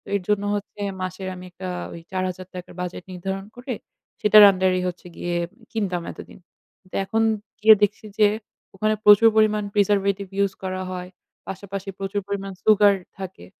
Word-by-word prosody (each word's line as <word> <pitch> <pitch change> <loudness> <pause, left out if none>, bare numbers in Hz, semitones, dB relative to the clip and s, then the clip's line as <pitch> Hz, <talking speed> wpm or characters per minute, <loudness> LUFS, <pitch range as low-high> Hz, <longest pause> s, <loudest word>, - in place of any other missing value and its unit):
এর 200 - 0
জন্য 205 -1 +2
হচ্ছে 205 0 -6 0.2
মাসের 185 +1 -4
আমি 180 0 -10
একটা 185 +1 -7 0.3
ওই 170 - -8
৳৪,০০০ 185 -1 -4
র - - -14
বাজেট 180 0 -5
নির্ধারণ 190 +2 -4
করে, 245 +1 -5 0.5
সেটার 210 0 +8
under 185 -1 +1
এই - - -2
হচ্ছে 180 0 -6
গিয়ে 175 - -3 0.2
উম 230 - -25
কিনতাম 185 -6 -2
এতদিন। - - -12 0.5
তা - - -3
এখন 225 +3 +1 0.4
গিয়ে 220 0 +9
দেখছি 205 +1 0
যে 210 - +7 0.5
ওখানে 215 +2 +1
প্রচুর 210 +2 +8
পরিমাণ 215 -1 +3
preservative 200 -1 +2
use 195 -1 -1
করা 185 0 -3
হয়, 180 0 -5 0.4
পাশাপাশি 195 0 -6
প্রচুর 195 +1 -2
পরিমাণ 195 -1 -3
সুগার 210 -2 +6 0.2
থাকে। 190 - -8
195 Hz, 165 wpm, -23 LUFS, 185-210 Hz, 0.5 s, গিয়ে